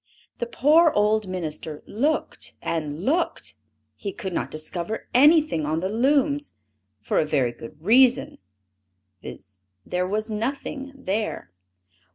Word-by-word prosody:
The 240 Hz, -, -2 dB
poor 305 Hz, +7 st, +5 dB
old 210 Hz, -4 st, +2 dB
minister 160 Hz, -4 st, -5 dB
looked 285 Hz, +9 st, -2 dB
and 155 Hz, +1 st, -3 dB
looked, 330 Hz, +5 st, 0 dB, 0.4 s
he 200 Hz, -, -5 dB
could 190 Hz, -1 st, -5 dB
not -, -, -2 dB
discover 170 Hz, +7 st, -5 dB
anything 295 Hz, -, +5 dB
on 155 Hz, +2 st, 0 dB
the 185 Hz, +3 st, -2 dB
looms, 285 Hz, +5 st, +1 dB, 0.5 s
for 105 Hz, -, 0 dB
a -, -, +2 dB
very 135 Hz, -5 st, +1 dB
good 120 Hz, +5 st, -12 dB
reason, 245 Hz, +8 st, +4 dB, 0.8 s
viz: 95 Hz, 0 st, -11 dB, 0.3 s
there 180 Hz, 0 st, -1 dB
was 215 Hz, +3 st, -1 dB
nothing 270 Hz, +5 st, -4 dB
there. 210 Hz, -, -3 dB
210 Hz, 125 wpm, -24 LUFS, 160-270 Hz, 0.8 s, poor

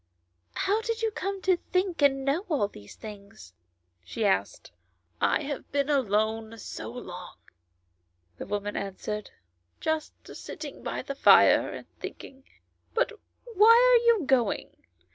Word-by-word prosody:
" 85 Hz, 0 st, -46 dB
How 415 Hz, +3 st, +2 dB
did 460 Hz, 0 st, -3 dB
you 445 Hz, -, +1 dB
come 395 Hz, -2 st, -4 dB
to 370 Hz, -2 st, +3 dB
think 365 Hz, -3 st, 0 dB
and 270 Hz, -1 st, +3 dB
know 290 Hz, +7 st, +1 dB
all 280 Hz, -11 st, +1 dB
these 105 Hz, -, -13 dB
things 200 Hz, -, -11 dB, 0.2 s
?" 85 Hz, 0 st, -47 dB
she 85 Hz, -, -3 dB
asked. 95 Hz, -1 st, 0 dB, 0.3 s
" 85 Hz, 0 st, -46 dB
I -, -, +2 dB
have 285 Hz, -1 st, -6 dB
been 285 Hz, +1 st, 0 dB
alone 220 Hz, -3 st, 0 dB
so 215 Hz, -, -7 dB
long," 180 Hz, -7 st, -9 dB, 1.0 s
the -, -, -6 dB
woman 205 Hz, 0 st, -3 dB
answered, 200 Hz, +2 st, -4 dB, 0.5 s
"just 315 Hz, -1 st, -2 dB, 0.2 s
sitting -, -, -8 dB
by -, -, -4 dB
the 275 Hz, -, -5 dB
fire 275 Hz, -, +5 dB
thinking. 265 Hz, 0 st, -9 dB, 0.5 s
But -, -, +2 dB, 0.3 s
why 440 Hz, -2 st, +4 dB, 0.3 s
are -, -, -7 dB
you 455 Hz, -7 st, +5 dB
going 255 Hz, -5 st, +1 dB
265 Hz, 145 wpm, -27 LUFS, -, 1.0 s, fire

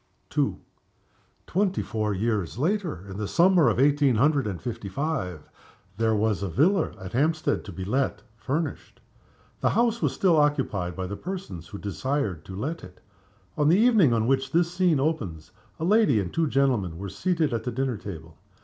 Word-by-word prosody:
II. -, -, +1 dB, 0.9 s
Twenty 190 Hz, -, 0 dB
four 105 Hz, +2 st, -2 dB
years 105 Hz, -2 st, -1 dB
later 165 Hz, -, -1 dB
in 95 Hz, 0 st, -7 dB
the 105 Hz, -1 st, -3 dB
summer 175 Hz, -, +4 dB
of 115 Hz, -, 0 dB
eighteen 140 Hz, -2 st, +4 dB
hundred 140 Hz, +1 st, +2 dB
and 95 Hz, -4 st, -4 dB
fifty 110 Hz, -4 st, -5 dB
five 95 Hz, -, -3 dB, 0.5 s
there 110 Hz, -1 st, +2 dB
was 105 Hz, -2 st, +1 dB
a 100 Hz, -, -2 dB
villa 165 Hz, -, +2 dB
at 95 Hz, 0 st, -8 dB
Hampstead 155 Hz, +5 st, +1 dB
to 100 Hz, -, -7 dB
be 95 Hz, -1 st, -6 dB
let, 130 Hz, +7 st, -1 dB
furnished. 140 Hz, +5 st, -4 dB, 0.6 s
The -, -, +2 dB
house 235 Hz, +1 st, +1 dB
was -, -, +2 dB
still 180 Hz, -4 st, +3 dB
occupied 130 Hz, -, +1 dB
by 95 Hz, 0 st, -3 dB
the 100 Hz, +2 st, -5 dB
persons 175 Hz, -, -6 dB
who 100 Hz, -, -8 dB
desired 105 Hz, -, -2 dB
to 95 Hz, -, -8 dB
let 150 Hz, -, -4 dB
it. -, -, -13 dB, 0.6 s
On 150 Hz, 0 st, +2 dB
the 175 Hz, -, +5 dB
evening 220 Hz, -, +5 dB
on 115 Hz, -1 st, +1 dB
which 135 Hz, +1 st, +1 dB
this 170 Hz, +2 st, +2 dB
scene 180 Hz, -5 st, +2 dB
opens 100 Hz, -, -2 dB, 0.3 s
a -, -, -3 dB
lady 200 Hz, -, +4 dB
and 90 Hz, -3 st, -4 dB
two 165 Hz, -1 st, +1 dB
gentlemen 125 Hz, -, +1 dB
were 100 Hz, +3 st, -5 dB
seated 155 Hz, -, 0 dB
at 115 Hz, -1 st, -2 dB
the 125 Hz, -, -3 dB
dinner 130 Hz, -1 st, -1 dB
table. 80 Hz, -6 st, -9 dB
130 Hz, 180 wpm, -26 LUFS, 100-160 Hz, 0.9 s, the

